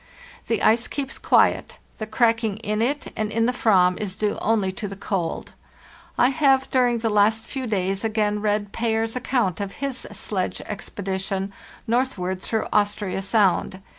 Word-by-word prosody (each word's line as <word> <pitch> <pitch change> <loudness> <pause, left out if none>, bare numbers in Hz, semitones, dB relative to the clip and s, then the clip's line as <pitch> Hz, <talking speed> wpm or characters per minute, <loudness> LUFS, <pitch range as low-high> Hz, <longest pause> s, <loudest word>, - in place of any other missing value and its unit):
The 230 - 0
ice 230 +2 +4
keeps 275 -2 -4
quiet; - - +3 0.2
the 215 - -4
cracking 225 -1 +1
in 215 -1 -2
it 280 +5 -1
and 215 -1 -2
in 225 +1 +2
the 250 - +1
Ayam 185 -7 +3
is 195 -3 -3
due 210 -1 -1
only 210 -4 +1
to 200 +2 -5
the 195 - -7
cold. 185 -4 -3 0.6
I 245 - +5
have 270 -2 +2
during 245 -2 +3
the 225 0 -1
last 215 +2 +3
few 265 -2 -4
days 195 -1 -1
again 210 -2 0
read 205 -1 0
Payer's 225 0 -1
account 240 -7 0
of 200 -1 -4
his 275 -2 -4
sledge 190 -3 -2
expedition 195 -1 -4 0.3
northward 210 -7 -1
through 220 +2 -1
Austria 205 -2 0
Sound. 195 -2 +2
215 Hz, 160 wpm, -23 LUFS, 195-230 Hz, 0.6 s, I